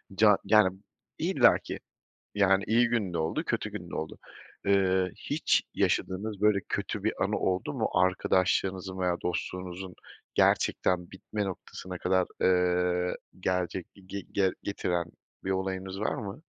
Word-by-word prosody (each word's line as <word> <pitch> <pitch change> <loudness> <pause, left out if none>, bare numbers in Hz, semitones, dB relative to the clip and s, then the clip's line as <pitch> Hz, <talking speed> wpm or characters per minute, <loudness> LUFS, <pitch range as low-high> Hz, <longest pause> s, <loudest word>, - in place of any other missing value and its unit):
ca 105 -1 +6
yani, 100 -2 +5 0.4
illaki, - - +3 0.6
yani, 95 -1 +4
iyi 120 +2 +4
günde 100 -8 0
oldu, 80 +1 -1
kötü - - -1
günde - - -7
oldu. 80 - -4 0.5
Eee, 95 -2 +3 0.2
hiç - - +3
yaşadığınız 100 +2 0
böyle, 105 -1 +4
kötü - - -3
bir - - +2
anı - - 0
oldu 90 -1 -1
mu - - 0
arkadaşlığınızın 95 +1 +1
veya 90 -1 +1
dostluğunuzun 90 +1 -4 0.4
gerçekten 90 -1 +2
bitme 105 +2 -4
noktasına 95 -1 -6
kadar, 95 0 +2
eee, 90 -1 +2 0.2
gelecek 90 -1 -1 0.2
ge 100 +1 -5
ge 95 -2 +3
getiren 90 -4 -1 0.4
bir 95 - -1
olayınız 95 0 -2
var 105 - 0
mı? 110 0 -6
95 Hz, 125 wpm, -29 LUFS, 90-100 Hz, 0.6 s, ca